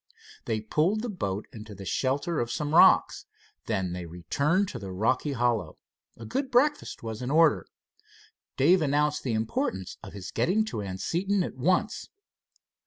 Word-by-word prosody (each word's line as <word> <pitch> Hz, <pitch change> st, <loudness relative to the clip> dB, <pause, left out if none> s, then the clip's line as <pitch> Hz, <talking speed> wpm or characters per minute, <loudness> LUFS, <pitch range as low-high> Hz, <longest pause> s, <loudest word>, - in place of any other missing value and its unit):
They 110 Hz, -1 st, -1 dB
pulled 160 Hz, -, +1 dB
the 245 Hz, -, -3 dB
boat 100 Hz, -, -3 dB
into 110 Hz, -2 st, -9 dB
the 100 Hz, 0 st, -9 dB
shelter 140 Hz, -, -1 dB
of 120 Hz, 0 st, -2 dB
some 150 Hz, 0 st, -2 dB
rocks. -, -, +5 dB, 0.4 s
Then 95 Hz, -5 st, -1 dB
they 90 Hz, -1 st, -6 dB
returned 140 Hz, -, 0 dB
to -, -, -6 dB
the 95 Hz, -1 st, -7 dB
rocky 115 Hz, +9 st, 0 dB
hollow. 115 Hz, -9 st, 0 dB, 0.4 s
A 115 Hz, -, -9 dB
good 265 Hz, -, -2 dB
breakfast 275 Hz, -, +1 dB
was 110 Hz, 0 st, -5 dB
in 125 Hz, -, -3 dB
order. 160 Hz, +3 st, +4 dB, 0.9 s
Dave 170 Hz, +7 st, +5 dB
announced 150 Hz, 0 st, +1 dB
the 125 Hz, -, -2 dB
importance 105 Hz, -4 st, -2 dB
of -, -, -10 dB
his 100 Hz, -2 st, -7 dB
getting 215 Hz, +5 st, +1 dB
to 165 Hz, -, -4 dB
Anseton 175 Hz, -, -1 dB
at -, -, -5 dB
once. 180 Hz, -, 0 dB
130 Hz, 160 wpm, -27 LUFS, 105-175 Hz, 0.9 s, rocks